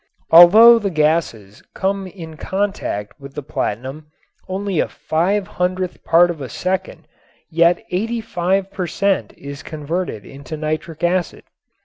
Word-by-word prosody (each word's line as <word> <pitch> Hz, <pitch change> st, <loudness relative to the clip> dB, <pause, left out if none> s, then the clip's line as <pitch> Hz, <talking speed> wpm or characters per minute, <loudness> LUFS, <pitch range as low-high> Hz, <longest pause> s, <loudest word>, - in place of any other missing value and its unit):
Although 215 Hz, +8 st, +9 dB
the 205 Hz, -2 st, -2 dB
gases 150 Hz, -, -1 dB
come 195 Hz, 0 st, -1 dB
in 165 Hz, -4 st, -10 dB
contact 190 Hz, -, -3 dB
with 140 Hz, -1 st, -12 dB
the 150 Hz, -, -5 dB
platinum 135 Hz, +4 st, -4 dB, 0.4 s
only 190 Hz, -2 st, -2 dB
a -, -, +1 dB
five 190 Hz, +6 st, -1 dB
hundredth 185 Hz, -2 st, -3 dB
part 175 Hz, +1 st, +4 dB
of 160 Hz, -4 st, -8 dB
a 130 Hz, -, -6 dB
second 185 Hz, 0 st, -3 dB, 0.4 s
yet 170 Hz, +2 st, +3 dB
eighty 225 Hz, +6 st, -1 dB
five 190 Hz, -1 st, -1 dB
per 185 Hz, -3 st, -3 dB
cent. 195 Hz, +3 st, 0 dB
is 140 Hz, 0 st, -8 dB
converted 155 Hz, -, -4 dB
into 140 Hz, +3 st, -9 dB
nitric 155 Hz, +1 st, -4 dB
acid. 175 Hz, 0 st, 0 dB
175 Hz, 135 wpm, -19 LUFS, 155-190 Hz, 0.4 s, Although